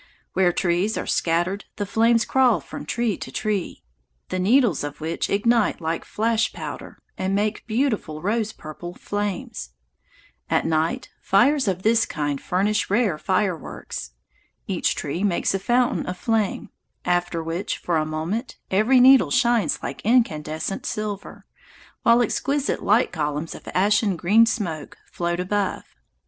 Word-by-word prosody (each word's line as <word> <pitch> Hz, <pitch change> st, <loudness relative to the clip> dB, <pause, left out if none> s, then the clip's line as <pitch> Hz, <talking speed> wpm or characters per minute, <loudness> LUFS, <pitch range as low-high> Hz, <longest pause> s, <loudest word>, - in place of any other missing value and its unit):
Where 185 Hz, -2 st, +3 dB
trees 180 Hz, +5 st, 0 dB
are -, -, -3 dB
scattered 175 Hz, +4 st, 0 dB
the 205 Hz, -, -2 dB
flames 230 Hz, +3 st, +3 dB
crawl 255 Hz, -4 st, +3 dB
from -, -, -9 dB
tree 235 Hz, -4 st, 0 dB
to -, -, -7 dB
tree, 210 Hz, -4 st, -2 dB, 0.5 s
the 185 Hz, -, -2 dB
needles 215 Hz, -, +3 dB
of 145 Hz, -1 st, -6 dB
which 160 Hz, +2 st, -2 dB
ignite 225 Hz, +2 st, +2 dB
like 165 Hz, 0 st, -3 dB
flash 225 Hz, 0 st, 0 dB
powder -, -, -7 dB, 0.2 s
and 190 Hz, +1 st, 0 dB
make 210 Hz, +3 st, -1 dB
beautiful 220 Hz, -, -1 dB
rose 215 Hz, +4 st, -1 dB
purple 175 Hz, 0 st, -9 dB
flames. 205 Hz, -, -4 dB, 0.8 s
At -, -, +1 dB
night 160 Hz, 0 st, 0 dB
fires 255 Hz, +6 st, +3 dB
of 185 Hz, -1 st, -1 dB
this 225 Hz, +1 st, +3 dB
kind 145 Hz, -2 st, -2 dB
furnish 205 Hz, +4 st, 0 dB
rare 205 Hz, -6 st, +1 dB
fireworks. 180 Hz, -, -2 dB, 0.5 s
Each -, -, 0 dB
tree 170 Hz, +7 st, -3 dB
makes 195 Hz, -2 st, +1 dB
a 195 Hz, -, 0 dB
fountain 245 Hz, +5 st, +1 dB
of 180 Hz, 0 st, -4 dB
flame, 220 Hz, -1 st, -1 dB, 0.3 s
after 175 Hz, -1 st, 0 dB
which, 165 Hz, +4 st, -3 dB
for 170 Hz, -2 st, -1 dB
a 155 Hz, -, +2 dB
moment, 160 Hz, -, -3 dB
every 215 Hz, +7 st, +4 dB
needle 265 Hz, +1 st, +7 dB
shines 240 Hz, -, +2 dB
like 140 Hz, -, -5 dB
incandescent 165 Hz, -7 st, 0 dB
silver, 210 Hz, -2 st, -5 dB, 0.6 s
while 235 Hz, +1 st, +5 dB
exquisite 280 Hz, +5 st, -1 dB
light 220 Hz, +5 st, +3 dB
columns 150 Hz, 0 st, -2 dB
of -, -, -12 dB
ashen 205 Hz, +1 st, +3 dB
green 215 Hz, +7 st, +5 dB
smoke 170 Hz, -9 st, -3 dB
float 175 Hz, 0 st, -2 dB
above. 195 Hz, +1 st, -1 dB
200 Hz, 140 wpm, -23 LUFS, 170-225 Hz, 0.8 s, needle